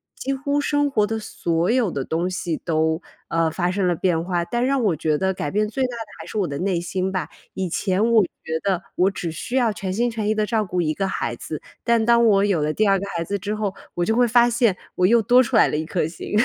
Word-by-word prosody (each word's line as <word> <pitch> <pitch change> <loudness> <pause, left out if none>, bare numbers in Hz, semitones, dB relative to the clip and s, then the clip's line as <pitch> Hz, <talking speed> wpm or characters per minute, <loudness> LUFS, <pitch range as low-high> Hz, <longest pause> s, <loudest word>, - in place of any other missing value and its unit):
几 275 - -3
乎 285 +2 -1
生 290 0 +1
活 210 -7 +2
的 225 +1 -2
所 170 -4 -1
有 245 -4 +2
的 140 - -3
东 165 +6 -1
西 175 -3 -3
都， 160 0 0 0.3
呃， 165 -1 +1
发 175 +2 -1
生 190 -1 0
了 175 - +2
变 165 -1 +1
化。 175 -2 0
但 240 +7 -1
让 270 -1 +1
我 195 -7 +2
觉 155 0 0
得 190 +4 0
改 150 - -3
变 210 +5 0
最 265 +5 -1
大 250 -1 -4
的 230 - -5 0.2
还 - - -8
是 - - -6
我 195 - +1
的 140 -2 -4
内 180 0 0
心 185 +2 -2
吧， 190 -1 -3 0.2
以 190 -1 -3
前 200 +6 +1
我 225 -3 +6 0.2
觉 160 0 -2
得 190 -3 0
我 185 +2 +3
只 175 -3 -4
需 235 +9 -5
要 245 -4 +3
全 190 -2 -4
心 240 +4 0
全 220 -2 -3
意 215 - +1
的 215 0 +1
照 220 -1 0
顾 180 -1 -1
1 155 -2 0
个 195 +4 -1
孩 195 - -2
子， - - -6 0.2
但 235 -2 +3
当 235 0 +5
我 200 -3 +4
有 195 -6 +1
了 150 +1 0
第 215 - +2
2 195 -1 +3 0.2
孩 170 - -1
子 200 +4 -3
之 205 +3 -3
后， 210 -2 -2 0.2
我 175 - -1
就 220 - +1
会 245 0 +4
发 240 +1 +5
现 235 -4 +2 0.2
我 180 - +3
又 235 +3 +5
多 245 +4 +5
出 255 0 -1
来 220 - +6
了 - - -1
1 155 - -2
颗 170 0 -1
心。 165 - -8
195 Hz, 275 characters per minute, -22 LUFS, 175-230 Hz, 0.3 s, 我